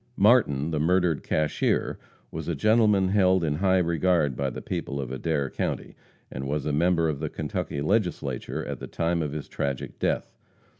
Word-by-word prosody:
Martin, 95 - +4
the 75 - 0
murdered 85 -1 +2
cashier, 75 -1 0 0.3
was 80 -1 -6
a 85 - -1
gentleman 105 +2 +3
held 95 -2 +3
in 75 -2 0
high 95 +1 +3
regard 85 -4 +2
by 70 0 -1
the - - -6
people 70 - -4
of 65 -2 -4
Adair 70 +1 -1
county, - - -4 0.4
and 65 +1 -5
was 75 0 -2
a 75 - -1
member 85 +2 +2
of 75 -3 -2
the - - -3
Kentucky 70 - -3
Legislature 95 +3 -1
at - - -5
the - - -7
time 85 0 -1
of 75 -2 -2
his 75 -1 -5
tragic 70 -2 -4
death. - - -1
80 Hz, 180 wpm, -26 LUFS, 70-95 Hz, 0.4 s, Martin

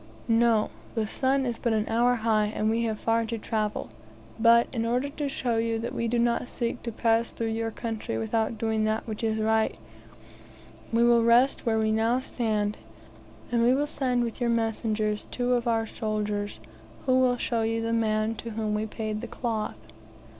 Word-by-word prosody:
"No; 230 -1 +3 0.2
the 220 -2 +1
sun 265 +5 0
is 240 -2 -3
but 235 -2 0
an 215 0 0
hour 240 +2 +3
high, 220 -2 +2
and 215 +1 0
we 230 +1 +1
have 220 -1 -1
far 230 0 +1
to 230 0 -3
travel; 215 -1 -2 0.5
but, 235 +1 +6
in 230 -3 -1
order 250 +4 0
to 285 0 -3
show 245 -4 -1
you 225 0 0
we 235 - -1
do 240 +1 0
not 235 +1 +1
seek 235 -2 -3
to 235 - -4
pass 230 +1 +1
through 225 -1 -3
your 225 0 -1
country 225 - -4
without 220 - -1
doing 220 0 0
that 215 +1 -1
which 220 0 -5
is 220 -1 +1
right, 220 0 +1 1.2
we 230 +1 +3
will 235 -1 +5
rest 240 +3 +4
where 220 -1 +3
we 220 0 +2
now 225 +3 +2
stand, 215 -5 -1 0.7
and 235 -1 +2
we 245 +2 +4
will 290 +2 +1
send 255 -4 0
with 235 +2 -5
your 240 - +2
messengers 220 -2 0
two 245 0 0
of 240 0 0
our 225 -1 +2
soldiers, 210 -2 -3 0.5
who 255 -1 +4
will 250 -1 +3
show 235 -1 -1
you 225 +1 0
the 230 0 -1
man 220 -1 +1
to 230 +1 -7
whom 215 -1 -2
we 210 +1 -1
paid 215 -1 -4
the 240 - -5
cloth." 220 - -3
225 Hz, 190 wpm, -27 LUFS, 220-235 Hz, 1.2 s, but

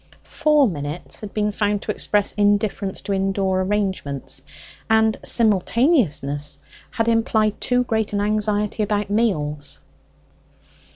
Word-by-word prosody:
Four 300 -3 +4
minutes 150 -2 -5
had 210 -2 -8
been 210 -1 0
found 205 0 -1
to - - -2
express 205 -1 0
indifference 205 -1 0
to 200 - -3
indoor 190 -1 0
arrangements, 190 -8 -2 0.5
and 220 0 +4
simultaneousness 200 - +1 0.3
had 225 0 -1
implied 220 -2 +1
too 250 0 +2
great 220 -3 -1
an 205 - -1
anxiety 210 0 0
about 205 -1 -1
meals. 150 -10 -1
205 Hz, 115 wpm, -22 LUFS, 190-220 Hz, 0.5 s, Four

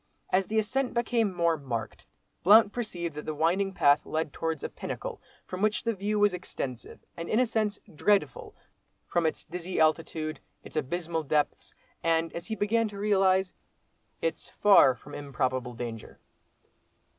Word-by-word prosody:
As 190 0 +2
the 220 - -1
ascent 255 +4 0
became 235 -3 +1
more 170 -2 +1
marked, 125 -6 -5 0.3
Blount 210 +2 +7
perceived 175 -9 -3
that 150 0 -7
the 155 - -2
winding 180 +6 +1
path 145 -6 +4
led 155 -2 -2
towards 160 -2 -3
a - - -2
pinnacle - - -6 0.2
from 185 +1 -6
which 215 0 +1
the 230 - 0
view 205 +1 -1
was 205 -2 +4
extensive, 135 -8 -6
and 170 0 -6
in 220 - +2
a 255 - +4
sense, 220 -3 -1 0.2
dreadful, 210 - +1 0.5
from 170 -2 +1
its 155 - -3
dizzy 180 +2 -4
altitude—its 155 0 -1
abysmal 165 +3 -2
depths,—and, 160 +2 -1
as 170 - -6
he 220 - -2
began 225 +2 +1
to 205 -1 -9
realise, 190 -2 +2 0.7
its 485 - -2
far 195 -11 +6
from 145 +4 -14
improbable 130 -3 -2
danger. 115 -2 -7
175 Hz, 150 wpm, -28 LUFS, 155-210 Hz, 0.7 s, Blount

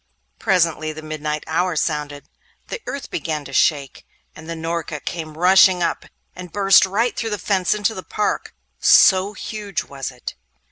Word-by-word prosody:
Presently 165 -4 +1
the 155 0 -9
midnight 155 -1 -4
hour 170 +2 0
sounded. 150 -2 -2 0.5
The - - -5
earth 280 -2 -6
began 155 -3 -3
to 140 - -10
shake, 140 -1 +1 0.3
and 160 +1 -11
the 165 - -3
Norka 165 -1 -4
came 155 -2 -5
rushing 185 0 +5
up, 165 - -2 0.3
and 180 -2 -9
burst 195 -2 +5
right 225 +6 0
through 225 - -3
the 210 - -2
fence 190 -1 0
into 210 +1 0
the 185 - -6
park, 210 +2 -3 0.2
so 190 +2 +5
huge 210 -3 -5
was 135 -2 -6
it. 125 -2 -8
170 Hz, 160 wpm, -21 LUFS, 155-195 Hz, 0.5 s, rushing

